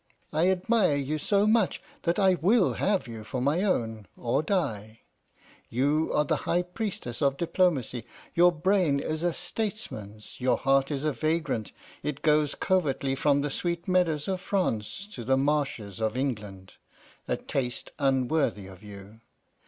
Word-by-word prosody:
I 165 Hz, +4 st, +3 dB
admire 190 Hz, -2 st, +2 dB
you 145 Hz, +2 st, -1 dB
so 200 Hz, +6 st, +2 dB
much 215 Hz, -2 st, +2 dB, 0.2 s
that 170 Hz, 0 st, 0 dB
I 190 Hz, -2 st, +5 dB
will 190 Hz, +4 st, +3 dB
have 195 Hz, -7 st, 0 dB
you 115 Hz, -2 st, -7 dB
for 115 Hz, +4 st, -4 dB
my 145 Hz, +7 st, +1 dB
own, 115 Hz, -, -1 dB
or 120 Hz, +4 st, 0 dB
die. 115 Hz, -, -2 dB, 0.7 s
You 145 Hz, +6 st, +1 dB
are 150 Hz, -, +3 dB
the -, -, +1 dB
high 175 Hz, +1 st, +3 dB
priestess 180 Hz, -, -4 dB
of 140 Hz, -1 st, +2 dB
diplomacy; 165 Hz, -8 st, 0 dB, 0.3 s
your 175 Hz, +1 st, +6 dB
brain 170 Hz, -3 st, +2 dB
is 155 Hz, +2 st, -3 dB
a 175 Hz, 0 st, +2 dB
statesman's, 115 Hz, -, -5 dB
your 125 Hz, 0 st, +3 dB
heart 135 Hz, 0 st, +2 dB
is 140 Hz, -2 st, -2 dB
a 155 Hz, -1 st, +1 dB
vagrant; 155 Hz, -5 st, -1 dB, 0.3 s
it 150 Hz, -2 st, -4 dB
goes 150 Hz, -1 st, +3 dB
covertly 145 Hz, -8 st, +1 dB
from 140 Hz, +1 st, +2 dB
the 145 Hz, 0 st, -2 dB
sweet 170 Hz, +4 st, -2 dB
meadows 170 Hz, -5 st, +2 dB
of 190 Hz, -2 st, -2 dB
France 185 Hz, -, -1 dB
to 120 Hz, -, -7 dB
the 130 Hz, +3 st, +2 dB
marshes 135 Hz, -8 st, -1 dB
of 110 Hz, +2 st, 0 dB
England, 105 Hz, -8 st, -4 dB, 0.5 s
a -, -, 0 dB
taste 125 Hz, -3 st, -3 dB
unworthy 135 Hz, -5 st, +1 dB
of 95 Hz, -1 st, -12 dB
you. 105 Hz, +1 st, -12 dB
145 Hz, 155 wpm, -28 LUFS, 120-180 Hz, 0.7 s, your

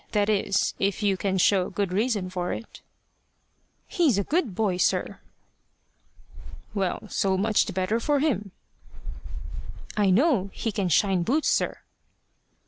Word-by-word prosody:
That 205 Hz, -1 st, +2 dB
is, 200 Hz, -2 st, +1 dB
if 200 Hz, +1 st, 0 dB
you 200 Hz, -2 st, +3 dB
can 190 Hz, 0 st, -1 dB
show 185 Hz, 0 st, +3 dB
good 195 Hz, -1 st, -2 dB
reason 205 Hz, -3 st, 0 dB
for 180 Hz, -1 st, -2 dB
it." 230 Hz, -, -9 dB, 1.1 s
"He's 310 Hz, -, +2 dB
a 200 Hz, -, +1 dB
good 290 Hz, -, -1 dB
boy, 200 Hz, -4 st, 0 dB
sir." 180 Hz, -, 0 dB, 1.5 s
"Well, 195 Hz, +1 st, -2 dB
so 190 Hz, -2 st, 0 dB
much 210 Hz, +2 st, +2 dB
the -, -, -3 dB
better 190 Hz, +5 st, 0 dB
for 290 Hz, +4 st, +1 dB
him." 225 Hz, -, 0 dB, 1.5 s
"I 205 Hz, -2 st, +3 dB
know 210 Hz, -, +3 dB
he 225 Hz, -, -2 dB
can 195 Hz, -3 st, -1 dB
shine 190 Hz, +3 st, +3 dB
boots, 275 Hz, -, +1 dB
sir." -, -, 0 dB
200 Hz, 135 wpm, -26 LUFS, 190-225 Hz, 1.5 s, you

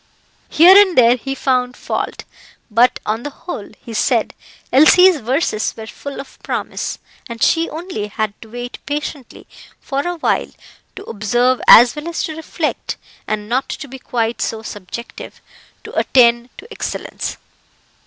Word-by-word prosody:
Here 350 Hz, +5 st, +7 dB
and 395 Hz, -3 st, +6 dB
there 240 Hz, -1 st, +6 dB
he 270 Hz, +2 st, -5 dB
found 250 Hz, -2 st, 0 dB
fault; -, -, -4 dB, 0.5 s
but, 235 Hz, +4 st, +3 dB
on 220 Hz, +2 st, -1 dB
the 290 Hz, -, -5 dB
whole, 285 Hz, -, -8 dB, 0.2 s
he 230 Hz, -, -8 dB
said -, -, +1 dB, 0.4 s
Elsie's 355 Hz, +5 st, +6 dB
verses 240 Hz, -2 st, -1 dB
were 220 Hz, -, -7 dB
full 280 Hz, +5 st, -8 dB
of 275 Hz, -, -11 dB
promise, -, -, -4 dB, 0.3 s
and 230 Hz, -1 st, -4 dB
she 330 Hz, 0 st, +2 dB
only 315 Hz, -, -5 dB
had 215 Hz, 0 st, -3 dB
to 225 Hz, -, -12 dB
wait 245 Hz, +2 st, -7 dB
patiently 290 Hz, -3 st, -5 dB, 0.3 s
for 275 Hz, -1 st, -2 dB
awhile 350 Hz, -2 st, -1 dB, 0.5 s
to -, -, -8 dB
observe 240 Hz, +4 st, 0 dB
as 240 Hz, +3 st, +9 dB
well 300 Hz, +2 st, -6 dB
as 340 Hz, -, -3 dB
to 315 Hz, -, -4 dB
reflect, 320 Hz, 0 st, -4 dB, 0.3 s
and 210 Hz, -1 st, -3 dB
not 255 Hz, +4 st, -1 dB
to 290 Hz, -, -6 dB
be 265 Hz, 0 st, -10 dB
quite 235 Hz, -2 st, -2 dB
so 220 Hz, 0 st, -3 dB
subjective 210 Hz, +4 st, -9 dB, 0.4 s
to -, -, -10 dB
attain 240 Hz, -1 st, +3 dB
to 445 Hz, -, -11 dB
excellence. -, -, -5 dB
250 Hz, 150 wpm, -18 LUFS, 230-305 Hz, 0.5 s, as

